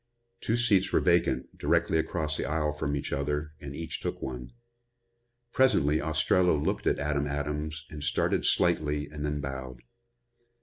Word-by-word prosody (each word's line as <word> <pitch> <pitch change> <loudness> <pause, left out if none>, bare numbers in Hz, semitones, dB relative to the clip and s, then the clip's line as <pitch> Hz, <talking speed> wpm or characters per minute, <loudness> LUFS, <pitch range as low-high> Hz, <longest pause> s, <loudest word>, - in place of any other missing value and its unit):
Two 115 - 0
seats 100 -5 +3
were - - +4
vacant, 85 -1 +1
directly 80 - +2
across 80 -1 -1
the - - -2
aisle 75 -1 0
from 75 -1 -2
each 70 - -3
other 75 +2 -2
and 70 -1 -7
each 80 +1 -4
took - - -4
one. 60 -2 -6 1.0
Presently 80 - +3
Ostrello 80 +2 +2
looked 70 - -1
at - - +3
Adam 75 0 -1
Adams 75 +2 -3
and 75 -2 -7
started 70 - +1
slightly 75 -1 +2
and 75 -1 -6
then 75 -1 -2
bowed. 65 -2 -6
75 Hz, 150 wpm, -29 LUFS, 70-80 Hz, 1.0 s, were